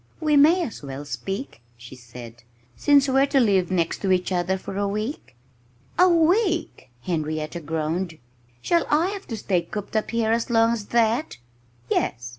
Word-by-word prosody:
"We 305 -2 +2
may 320 +6 +5
as 235 - -6
well 140 0 -7
speak," 195 - -5 0.2
she 120 +2 -12
said, 120 -1 -12 0.3
"since 280 - +4
we're 270 +1 +3
to 275 - +2
live 195 -7 +2
next 170 -3 -1
to 195 - 0
each 185 0 +1
other 180 +1 0
for 190 - -8
a 200 0 0
week." 215 - -4 0.6
"A 365 +1 +7
week!" 340 - +1
Henrietta 155 -1 -3
groaned. 160 +2 -3 0.5
"Shall 340 -1 +1
I 320 +5 +2
have 400 -1 -7
to 225 - -5
stay 185 -4 0
cooped 205 +5 -7
up 215 - 0
here 230 -1 0
as 230 +2 0
long 230 -1 +3
as 210 -3 -5
that?" 235 - +1 0.5
"Yes!" 120 0 -1
205 Hz, 170 wpm, -24 LUFS, -, 0.6 s, A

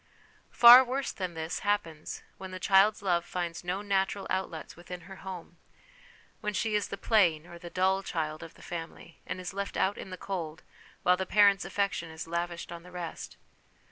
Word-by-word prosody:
Far 245 +2 +10
worse 260 +2 -2
than 185 -4 -5
this 160 +1 -3
happens 170 -7 -2 0.2
when 190 - -7
the 185 0 -7
child's 200 +2 +4
love 175 -3 +2
finds 175 -1 -4
no 180 +3 -2
natural 195 0 0
outlets 185 -4 -3
within 175 +1 -9
her 190 +3 -11
home: 180 -3 -9 0.8
when 210 -2 -3
she 220 +2 0
is 210 -1 +1
the 200 - -6
plain 175 -10 +3
or 175 0 -11
the 175 0 -9
dull 190 +2 +2
child 155 -5 -3
of 165 - -10
the - - -16
family, 165 0 -8
and - - -4
is 180 0 -6
left 200 0 -4
out 195 +2 +1
in - - -7
the 185 - -7
cold, 170 -5 -5 0.4
while 180 0 +4
the 190 0 -3
parents' 200 -2 +5
affection 200 -4 -1
is 160 +1 -7
lavished 170 0 -3
on 170 -1 -7
the 180 - -14
rest. 175 -2 -7
185 Hz, 190 wpm, -29 LUFS, 170-200 Hz, 0.8 s, Far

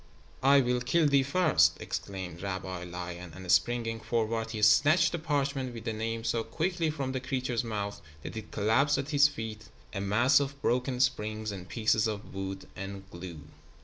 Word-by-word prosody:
"I 140 +1 +6
will 125 -1 0
kill 160 +6 +2
thee 140 -1 +4
first," 130 - +3
exclaimed 95 -3 -5
Rabbi 95 -2 -4
Lion, 90 -1 -7
and 95 -1 -3
springing 115 +2 +2
forward 115 0 -1
he 110 -1 -4
snatched 145 - +5
the 170 - -2
parchment 140 -5 -1
with 115 - -7
the 110 - -1
Name 115 +1 -3
so 115 0 0
quickly 165 +7 -1
from 140 -4 -3
the 130 - -2
creature's 130 -2 -2
mouth 105 -3 -4 0.2
that - - -7
it 110 -1 -6
collapsed 135 +8 +2
at 140 +3 -3
his 145 0 +6
feet 110 -6 -7 0.2
a 100 - -3
mass 115 +8 +4
of 140 0 -3
broken 125 0 0
springs 110 -4 0
and 95 -2 -8
pieces 110 -1 +2
of 105 -1 -5
wood 95 0 -5
and 95 0 -7
glue. 85 -3 -8
115 Hz, 180 wpm, -30 LUFS, 100-135 Hz, 0.2 s, I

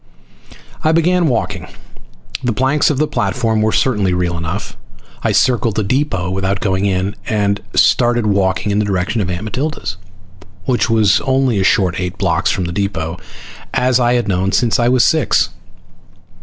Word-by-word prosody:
I 155 - +3
began 170 +1 +2
walking. 100 - -2 0.8
The 120 -2 0
planks 135 +6 +2
of 150 - -1
the 155 - +2
platform 115 -6 -1
were 110 0 +2
certainly 105 -9 +1
real 90 -1 -1
enough. 85 +4 -5 0.5
I - - 0
circled 120 -4 +2
the 110 - 0
depot 100 -6 -1
without 95 +1 -1
going 95 -1 0
in, 95 0 0
and 100 -1 0
started 120 -2 +3
walking 100 0 +1
in 100 - +1
the 105 - +1
direction 100 +3 -1
of 90 - -2
Aunt 90 +2 -4
Matilda's, 125 - -4 0.7
which 125 -1 +1
was 110 -4 +3
only 130 -5 +1
a - - +1
short 95 -4 +2
eight 90 -1 -4
blocks - - 0
from 95 - -1
the 85 - -4
depot, 90 -4 -2 0.6
as 125 0 +2
I 120 0 +2
had 120 -3 0
known 95 0 0
since 115 +4 +1
I 120 - +2
was 125 -1 +4
six. 155 -9 +2
105 Hz, 170 wpm, -16 LUFS, 95-125 Hz, 0.8 s, was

